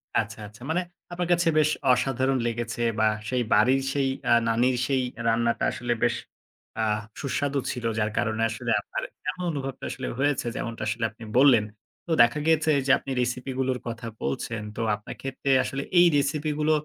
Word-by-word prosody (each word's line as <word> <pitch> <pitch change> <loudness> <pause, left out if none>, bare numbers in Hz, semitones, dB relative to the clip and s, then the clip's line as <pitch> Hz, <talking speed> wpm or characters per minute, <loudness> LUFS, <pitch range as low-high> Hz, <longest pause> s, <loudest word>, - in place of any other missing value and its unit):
আচ্ছা, - - 0
আচ্ছা। 105 +3 -16
মানে 175 +3 +1 0.3
আপনার 175 0 -2
কাছে 175 -1 +1
বেশ 155 0 +4 0.2
অসাধারণ 130 +1 +1
লেগেছে 120 +1 -3 0.2
বা 110 - +4 0.2
সেই 125 -1 +1
বাড়ির 130 +6 +4
সেই 140 -2 +1 0.2
আ - - +8
নানীর 120 +3 +2
সেই 135 -2 +1 0.3
রান্নাটা 115 +1 +1
আসলে 120 0 -1
বেশ - - +3 0.7
আহ 105 -1 +1 0.2
সুস্বাদু 140 0 -1
ছিল। 120 -2 -5
যার 105 0 0
কারণে 115 -1 0
আসলে 115 +1 -3
আপনার - - -5 0.3
এমন 180 - -4
অনুভবটা 135 -2 -5
আসলে - - -5
হয়েছে 145 -3 +1
যেমনটা 115 -1 -4
আসলে 110 - -2
আপনি 115 +1 -13
বললেন। 130 -6 +6 0.4
তো - - -4
দেখা 120 +6 +4
গেছে 160 -1 +3
যে 140 - +3
আপনি 135 - -7
recipe 125 +2 -2
গুলোর 130 -1 0
কথা 115 0 -5 0.2
বলছেন। 105 +11 -3
তো - - -7 0.2
আপনার 105 - -9
ক্ষেত্রে 135 +1 -4
আসলে 135 0 -3 0.2
এই 175 - +8
recipe 145 +2 +1
গুলো, 155 +1 +2
130 Hz, 175 wpm, -26 LUFS, 115-140 Hz, 0.7 s, আ